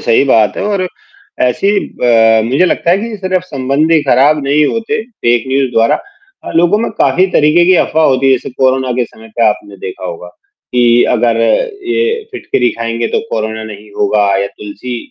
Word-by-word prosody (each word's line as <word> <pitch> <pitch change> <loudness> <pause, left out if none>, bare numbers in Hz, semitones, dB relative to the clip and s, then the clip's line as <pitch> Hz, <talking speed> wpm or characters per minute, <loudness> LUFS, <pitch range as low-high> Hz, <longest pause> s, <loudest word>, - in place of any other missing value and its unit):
सही 115 +4 +2
बात 110 -6 +2
है - - -3
और 200 -3 -1 0.6
ऐसी 195 +12 +1
अ, 115 -2 +2
मुझे 135 +10 +2
लगता 170 - 0
है 180 - +3
कि 225 +1 -5
सिर्फ 185 -2 -1
संबंध 140 +1 -1
ही 160 - +4
खराब 145 +2 +3
नहीं 145 +2 +2
होते 225 +3 -2
फेक 120 - -1
न्यूज़ 135 -1 0
द्वारा 115 0 +2 0.5
और - - -7
लोगों 175 +5 +3
में 230 - -2
काफ़ी 185 +1 +3
तरीके 155 +2 +3
की 185 - +5
अफवाह 160 0 0
होती 135 0 +1
है। 135 - +5
जैसे 130 0 -2
कोरोना 130 0 0
के 125 - +2
समय 110 0 -15
पे 120 - +3
आपने 105 -1 -4
देखा 95 0 -8
होगा 90 0 -7 0.5
कि 120 -1 +4
अगर 115 -1 +1 0.5
ये 455 +4 0
फिटकरी 125 - -1
खाएँगे 115 0 -2
तो - - +1
कोरोना 110 0 -3
नहीं 105 -1 -11
होगा 105 -1 +2 0.2
या - - -2
तुलसी 105 +4 -7
130 Hz, 185 wpm, -13 LUFS, 115-175 Hz, 0.6 s, की